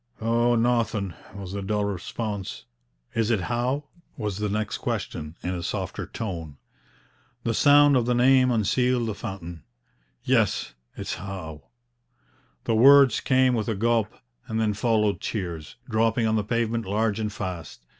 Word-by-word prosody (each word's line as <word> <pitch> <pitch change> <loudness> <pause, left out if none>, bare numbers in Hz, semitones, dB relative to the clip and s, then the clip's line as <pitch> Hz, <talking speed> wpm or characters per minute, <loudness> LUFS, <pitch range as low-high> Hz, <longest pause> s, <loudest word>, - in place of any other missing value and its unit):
'Oh, 120 +2 +2
nauthin',' 115 -5 +1 0.2
was 100 -2 -7
the 100 - -3
dull 105 +1 -1
response. 100 - -4 0.5
'Is 115 -1 0
it 110 -5 +2
Howe?' 125 - -1 0.3
was 105 -4 -3
the 105 0 -1
next 105 +1 -2
question, 75 +2 -4
in 90 - -2
a 90 - -4
softer - - -4
tone. 85 -10 -6 0.9
The 115 - 0
sound 145 +3 +6
of 120 -2 +2
the 125 - +2
name 130 +1 +5
unsealed 125 +2 +1
the 110 - -2
fountain. 95 -6 -7 0.6
'Yes, - - +1 0.2
it's - - -4
Howe.' 80 -7 -7 1.0
The 115 - 0
words 135 +1 +7
came 130 -1 +3
with 110 -3 -1
a 110 - 0
gulp, 115 +1 +1 0.4
and 110 0 -2
then 110 -2 +1
followed 105 -1 +1
tears, 85 -8 -4
dropping 115 +1 +1
on 110 0 +2
the 105 - +1
pavement 115 0 -1
large 105 +1 0
and 105 -1 -2
fast. 90 -10 -6
110 Hz, 150 wpm, -25 LUFS, 95-120 Hz, 1.0 s, words